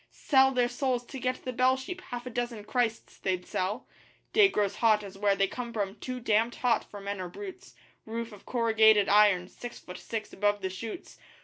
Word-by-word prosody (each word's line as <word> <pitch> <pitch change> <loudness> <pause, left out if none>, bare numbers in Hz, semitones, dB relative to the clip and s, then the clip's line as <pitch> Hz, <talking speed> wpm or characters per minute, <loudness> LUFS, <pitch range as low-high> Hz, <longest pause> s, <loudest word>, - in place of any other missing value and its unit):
Sell 265 -2 +3
their 250 -2 +2
souls 245 0 -1
to 265 - -8
get 255 +1 -2
the 255 - -3
bell 255 +2 +3
sheep 355 +8 -6
half 245 0 -5
a 250 - -6
dozen 240 -2 -3
Christs 230 0 -2
they'd 185 -2 -1
sell! 205 +7 -3 0.5
Day 415 -3 +7
grows 205 - 0
hot 215 -2 +3
as 195 -1 -9
where 200 0 +2
they 195 - +3
come 240 +4 -5
from 200 -4 -2
too 255 +2 -5
damned 225 0 +1
hot 245 -2 +1
for 205 - -11
men 200 -1 -4
or 180 - -5
brutes; 380 - -9 0.3
Roof 230 +1 -4
of 205 -2 -13
corrugated 220 -3 +4
iron, 200 -3 +5
six 240 +5 -9
foot 180 - -10
six 220 -2 -5
above 205 0 +1
the 190 - -1
shoots! 225 - -8
230 Hz, 205 wpm, -29 LUFS, 205-250 Hz, 0.5 s, Day